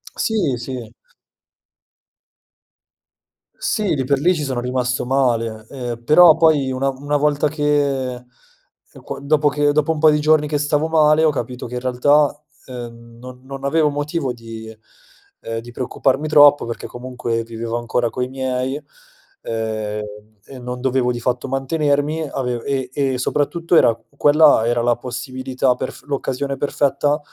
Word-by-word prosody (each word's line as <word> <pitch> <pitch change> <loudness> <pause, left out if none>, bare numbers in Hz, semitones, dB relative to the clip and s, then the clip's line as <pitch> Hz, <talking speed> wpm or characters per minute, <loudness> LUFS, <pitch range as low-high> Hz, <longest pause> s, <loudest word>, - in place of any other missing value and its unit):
Sì, 205 - 0
sì. 120 -2 -7 2.6
Sì, 210 -7 -1
lì 135 - -1
per 140 +1 +1
lì 180 +5 +3
ci 150 - -3
sono 130 -3 -2
rimasto 125 0 -1
male, 115 -4 0
ehm, 120 -3 -6
però 160 +4 +7
poi 155 -5 +3
una 130 +1 0
v 130 0 -14
una 145 +1 0
volta 145 0 +1
che, 145 -3 0
ehm, 125 0 -13 0.8
qua - - -7
dopo 145 +1 +2
che 145 0 +1
dopo 150 +2 +1
un 155 - -5
po' 155 0 +6
di 150 - +2
giorni 155 0 +3
che 150 0 -1
stavo 150 +1 0
male, 155 -1 +4
ho 155 - +4
capito 125 -2 -5
che 125 - -7
in - - -2
realtà, 140 +4 +2 0.3
ehm, 115 -2 -9
non 125 0 -11
non 135 0 -8
avevo 150 +2 +2
motivo 145 -1 -2
di, 115 -1 -9 0.6
ehm, 115 0 -5
di 120 +1 -11
preoccuparmi 135 +4 -1
troppo 145 -1 +6
perché 115 - -6
comunque 120 -2 -4
vivevo 115 0 -4
ancora 120 0 -1
coi 125 +2 -2
miei, 130 0 -2 0.7
ehm, 110 -2 -3 0.4
e 135 - -11
non 125 0 -6
dovevo 125 -1 +1
di 120 - -4
fatto 125 +2 -2
mantenermi 145 +3 -1
avev 125 -3 -3
e 135 -2 -2
e 135 -3 0
soprattutto 165 +6 0
era 115 -7 +5 0.2
quella 145 -6 +5
era 120 0 +1
la 120 0 +2
possibilità 130 +1 -2
perf 130 - -6
l'occasione 140 -1 -3
perfetta, 145 +1 0
135 Hz, 155 wpm, -20 LUFS, 125-145 Hz, 2.6 s, però